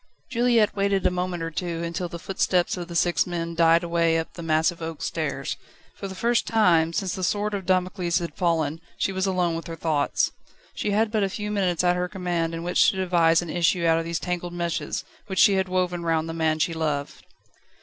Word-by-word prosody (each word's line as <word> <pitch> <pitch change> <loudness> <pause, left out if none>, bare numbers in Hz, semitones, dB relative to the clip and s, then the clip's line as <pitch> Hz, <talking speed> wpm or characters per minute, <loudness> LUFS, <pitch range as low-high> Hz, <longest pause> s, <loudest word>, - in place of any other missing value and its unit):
Juliette 235 -3 +3
waited 200 -1 +1
a - - +4
moment 180 -1 -2
or 165 - -4
two, 170 0 -3
until 170 +1 -3
the 170 - -6
footsteps 180 0 0
of 175 -2 -6
the 170 - -8
six 175 +1 +2
men 170 -1 -3
died 165 +1 +4
away 170 -1 +2
up 160 - -4
the 170 - -8
massive 165 +1 +1
oak 160 -1 -5
stairs. 140 -4 -3 0.4
For 200 - -7
the 190 - -8
first 235 +5 +1
time, 175 -8 +3
since 190 +1 -2
the 185 - -4
sword 205 +3 0
of 195 -3 -4
Damocles 185 -2 +1
had 170 -4 -3
fallen, 165 -2 0 0.2
she - - 0
was 190 0 -1
alone 180 -3 +1
with 165 +1 -6
her 165 - -5
thoughts. 155 -3 0 0.4
She - - -2
had 210 +1 +1
but 220 -2 +1
a 195 - +1
few 210 +2 -4
moments 185 -4 0
at 180 0 +3
her 180 0 -1
command 175 -3 -2
in 165 - -5
which 175 +1 +4
to - - -2
devise 175 -3 +3
an 170 - -6
issue 175 0 +1
out 165 0 +4
of - - -2
these 165 0 -2
tangled 175 -1 -3
meshes, 170 -1 -2 0.2
which 190 -2 -5
she 200 - +6
had 190 -1 0
woven 180 -1 0
round 165 -1 0
the 165 - -4
man 160 -1 +1
she 160 +2 0
loved. 150 -3 -3
175 Hz, 220 wpm, -25 LUFS, 165-190 Hz, 0.4 s, she